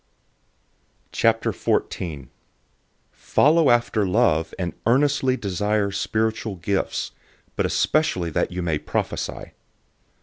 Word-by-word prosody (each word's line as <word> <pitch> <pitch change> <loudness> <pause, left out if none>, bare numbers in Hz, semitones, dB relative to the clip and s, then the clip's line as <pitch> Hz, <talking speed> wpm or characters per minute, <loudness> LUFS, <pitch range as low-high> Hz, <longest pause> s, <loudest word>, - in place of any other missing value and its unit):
014:001 75 -7 0 0.8
Follow 155 0 +3
after 120 -3 +2
love, 90 -5 +2
and 90 -2 -3
earnestly 130 +1 +2
desire 105 0 -1
spiritual 110 0 -1
gifts, 95 +2 -2 0.4
but - - +1
especially 95 - +1
that - - 0
you 90 0 -3
may 80 -3 0
prophesy. - - -4
105 Hz, 90 wpm, -23 LUFS, 90-120 Hz, 0.8 s, Follow